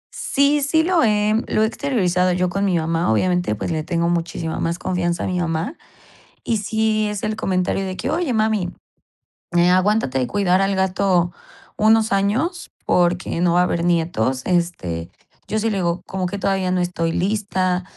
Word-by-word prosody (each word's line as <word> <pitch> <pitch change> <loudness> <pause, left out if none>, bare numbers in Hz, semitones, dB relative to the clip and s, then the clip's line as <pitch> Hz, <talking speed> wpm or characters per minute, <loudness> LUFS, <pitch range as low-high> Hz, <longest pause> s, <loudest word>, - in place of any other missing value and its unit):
Sí, 285 +1 +2
sí 320 +3 +2
lo 350 -1 +2
he, 210 -1 +2
lo 215 - +1
he - - +4
exteriorizado 185 -8 0
yo 180 0 +1
con 195 +2 -1
mi 185 -3 +2
mamá. 165 -2 0
Obviamente, 180 +2 +1
pues, 105 - -4
le 160 -1 -1
tengo 170 +1 0
muchísima 170 -1 -2
más 170 +1 -1
confianza 175 -2 -1
a - - -2
mi 180 -1 -1
mamá. 165 - -2 0.7
Y 225 - 0
sí, 215 +1 0
es 210 -1 -4
el 215 0 -1
comentario 195 -2 -1
de 185 -1 -4
que: 245 - -3
"Oye, 315 -1 0
mami, 215 -5 +1 0.9
eh, 175 +1 +4
aguántate 185 -6 +2
de 130 - +1
cuidar 185 +3 +1
al 195 0 +1
gato 190 -2 +1 0.5
unos 220 +1 +3
años 220 - 0 0.2
porque 175 -1 +1
no 175 -1 +2
va 175 - +4
a - - +4
haber 170 -1 -1
nietos". 160 -7 0
Este, 170 - -1 0.4
yo 215 - -1
sí 225 +1 0
le 205 - -1
digo: 175 -2 -1
"Como 190 -1 -3
que 200 +3 -4
todavía 190 -2 0
no 185 0 +1
estoy 170 -2 -1
lista", 185 -1 0
185 Hz, 185 wpm, -21 LUFS, 175-215 Hz, 0.9 s, he